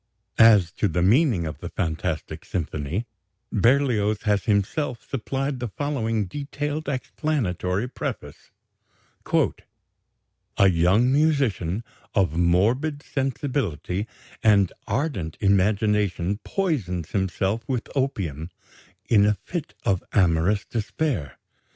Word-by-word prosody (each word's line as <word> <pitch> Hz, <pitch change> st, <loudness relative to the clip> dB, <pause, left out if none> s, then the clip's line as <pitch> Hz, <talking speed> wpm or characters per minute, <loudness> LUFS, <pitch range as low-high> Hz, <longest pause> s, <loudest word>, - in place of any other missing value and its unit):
As 105 Hz, -6 st, +7 dB
to 105 Hz, -, 0 dB
the 90 Hz, -1 st, 0 dB
meaning 110 Hz, -, +3 dB
of 80 Hz, -, -5 dB
the -, -, -6 dB
"Fantastic 80 Hz, -2 st, -3 dB
Symphony," 80 Hz, +3 st, -3 dB, 0.5 s
Berlioz 115 Hz, -2 st, +2 dB
has 105 Hz, -4 st, +1 dB
himself 115 Hz, +6 st, 0 dB
supplied 135 Hz, +2 st, -2 dB
the 120 Hz, -, -2 dB
following 115 Hz, -4 st, -1 dB
detailed 145 Hz, -, -4 dB
explanatory 125 Hz, -, -1 dB
preface: 125 Hz, -, -6 dB, 2.1 s
"A 100 Hz, -, +6 dB
young 95 Hz, +8 st, +3 dB
musician 135 Hz, -, +1 dB, 0.3 s
of 95 Hz, -6 st, +2 dB
morbid 115 Hz, -, +2 dB
sensibility 125 Hz, -, -2 dB, 0.3 s
and 100 Hz, -4 st, +4 dB
ardent 100 Hz, -, -2 dB
imagination 100 Hz, -1 st, +2 dB
poisons 110 Hz, -, -2 dB
himself 95 Hz, +2 st, 0 dB
with 125 Hz, -3 st, -1 dB
opium 90 Hz, -, -2 dB, 0.6 s
in 105 Hz, -2 st, +5 dB
a 105 Hz, -, +3 dB
fit 170 Hz, -4 st, -5 dB
of 95 Hz, -3 st, +1 dB
amorous 95 Hz, +3 st, +3 dB
despair. 115 Hz, -, -2 dB
105 Hz, 100 wpm, -24 LUFS, 90-135 Hz, 2.1 s, As